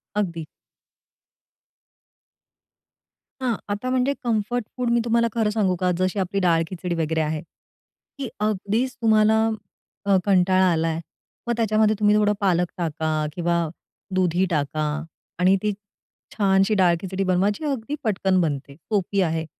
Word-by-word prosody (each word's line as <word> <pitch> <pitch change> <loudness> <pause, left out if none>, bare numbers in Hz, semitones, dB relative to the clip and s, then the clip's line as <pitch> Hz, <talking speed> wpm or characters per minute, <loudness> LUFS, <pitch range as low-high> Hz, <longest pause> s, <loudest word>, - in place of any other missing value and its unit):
अगदी. 170 -6 -2 3.0
हां. 245 -3 +1
आता 205 +5 -2
म्हणजे 255 +2 +1
कम्फर्ट 230 0 -1
फूड 250 -1 0
मी 235 - +3
तुम्हाला 235 0 +2
खरं 225 -2 +1
सांगू 205 -4 +1
का? 180 +1 0
जशी 185 +2 0
आपली 195 +1 -1
डाळ 170 -3 +3
खिचडी 180 -1 -3
वगैरे 160 -1 0
आहे. 155 0 -2 0.8
की 270 -4 -4
अगदीचं 215 +4 -1
तुम्हाला 220 0 +4 0.6
अ, 200 -1 +4
कंटाळा 185 -1 +4
आला 165 0 +1
आहे, 160 0 -1 0.5
मग 240 - +1
त्याच्यामध्ये 215 -1 +3
तुम्ही 210 0 +4
थोडं 210 0 +3
पालक 180 -3 +2
टाका 160 -2 -2 0.2
किंवा 175 0 0 0.6
दुधी 180 0 +2
टाका 155 -1 -1 0.6
आणि 185 +2 +5
ती 210 - +1 0.6
छानशी 195 0 +3
डाळ 180 -3 +4
खिचडी 190 0 -2
बनवा, 185 +1 +2
जी - - -9
अगदी 275 -1 -2
पटकन 190 -4 +1
बनते. 140 -4 -3
सोपी 195 +3 -1
आहे. 160 -2 0
195 Hz, 140 wpm, -23 LUFS, 175-220 Hz, 3.0 s, आणि